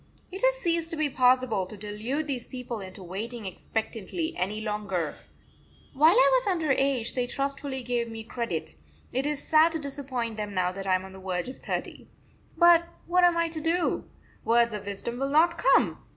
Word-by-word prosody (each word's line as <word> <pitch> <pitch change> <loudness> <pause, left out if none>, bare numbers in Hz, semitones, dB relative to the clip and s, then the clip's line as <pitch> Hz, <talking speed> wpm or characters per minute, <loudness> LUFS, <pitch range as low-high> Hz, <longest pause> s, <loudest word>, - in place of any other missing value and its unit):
It 380 - -2
has - - +4
ceased 335 -8 0
to 330 - 0
be 305 -2 0
possible 250 -7 +3
to 210 - -9
delude 215 +9 -3
these 260 -5 -4
people 250 -3 -5
into 190 0 -9
waiting 215 +5 -5
expectantly 225 - -3
any 205 +4 -2
longer. 205 -7 -2 0.8
While 315 +7 +5
I - - +6
was 475 - -7
under 330 -6 +1
age 270 -3 +1
they 250 -1 -1
trustfully 275 0 -3
gave 240 -1 -1
me 225 0 -7
credit; 235 +1 -4 0.4
it 265 +3 0
is 295 -1 -3
sad 320 +1 +5
to 320 - -1
disappoint 265 -6 -4
them 210 -2 -4
now 180 -1 +1
that 195 +1 -6
I 185 - +4
am 185 +1 -2
on 190 - -11
the 190 - -11
verge 185 +3 -2
of 260 - -9
thirty. - - -4 0.5
But 345 0 +6 0.2
what 360 +1 +3
am 350 -1 +5
I 335 0 +2
to 320 -1 -4
do? 335 +3 0 0.3
Words 235 0 +3
of 205 -1 -6
wisdom 235 +4 -3
will 275 0 -1
not 335 +4 +3
come! - - +3
250 Hz, 195 wpm, -27 LUFS, 210-315 Hz, 0.8 s, I